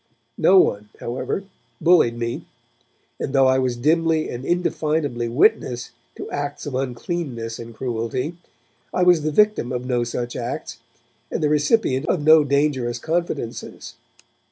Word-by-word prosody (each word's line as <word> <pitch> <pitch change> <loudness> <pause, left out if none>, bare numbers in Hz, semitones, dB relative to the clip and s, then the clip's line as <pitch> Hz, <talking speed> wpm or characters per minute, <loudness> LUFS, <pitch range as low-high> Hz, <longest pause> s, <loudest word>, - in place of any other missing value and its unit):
No 190 - +6
one, 105 - +2
however, 130 +10 -3 0.4
bullied 165 -9 +4
me, 115 0 -4 0.7
and 135 - -3
though 135 -1 +5
I 130 0 +4
was 125 -2 -1
dimly 160 +4 +1
and 120 +1 -6
indefinably 155 -7 -1
witness 120 0 +1 0.2
to - - -7
acts 145 0 -4
of 145 - -5
uncleanness 125 -2 -3
and 115 -1 -9
cruelty, 125 +5 -3 0.6
I 180 - +3
was 175 -3 +5
the 155 - -1
victim 210 - +2
of 125 0 -3
no 125 -2 0
such 120 0 -4
acts - - -5 0.5
and - - -3
the 150 - +3
recipient 150 - +2
of 160 - 0
no 155 0 +7
dangerous 140 -4 0
confidences. 160 -5 -4
135 Hz, 140 wpm, -22 LUFS, 120-160 Hz, 0.7 s, no